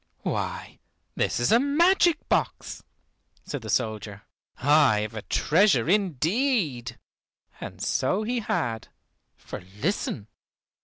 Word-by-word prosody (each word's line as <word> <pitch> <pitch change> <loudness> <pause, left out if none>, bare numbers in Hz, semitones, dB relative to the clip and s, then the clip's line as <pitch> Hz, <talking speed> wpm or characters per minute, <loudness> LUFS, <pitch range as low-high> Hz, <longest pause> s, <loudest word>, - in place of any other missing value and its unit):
"Why, - - -4 0.3
this - - -1
is 120 - +1
a 230 - +6
magic 335 +4 +3
box," - - -1 0.6
said 145 - -5
the 110 - -8
soldier. 105 0 -2 0.3
"I 140 -6 +4
have 105 +1 -4
a 110 - -5
treasure 160 - +2
indeed." 175 - 0 0.6
And - - -8
so 190 +11 0
he 240 +3 -1
had, 115 - -2 0.5
for - - -8
listen! 105 - -3
145 Hz, 110 wpm, -26 LUFS, -, 0.6 s, a